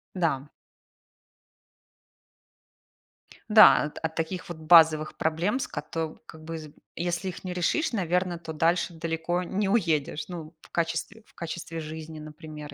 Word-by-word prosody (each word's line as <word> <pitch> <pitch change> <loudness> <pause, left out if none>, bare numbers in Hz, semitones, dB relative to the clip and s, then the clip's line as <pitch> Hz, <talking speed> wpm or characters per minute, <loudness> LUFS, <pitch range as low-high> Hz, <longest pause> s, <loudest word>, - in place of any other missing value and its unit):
Да. 150 -5 -1 3.0
Да, 215 -6 +8
от 150 - -5
от 160 0 -2
таких 165 +3 -3
вот 175 - -6
базовых 160 -1 +5
проблем, 170 +10 0
с - - -2
кото 160 -1 -4
как 155 0 -12
бы, 165 +1 -5
з 155 -2 -9 0.2
если 175 +2 -2
их 180 - -9
не 180 -1 -4
решишь, 180 - +1
наверно, 180 -2 0
то 165 -1 -7
дальше 170 +3 +1
далеко 165 +2 -2
не 195 +3 -1
уедешь. 160 -8 +1
Ну, 165 -2 -8
в - - -18
качестве 170 +6 -2
в - - -26
качестве 165 0 -6
жизни, 155 0 -7
например, 150 -1 -9
165 Hz, 140 wpm, -27 LUFS, 155-180 Hz, 3.0 s, Да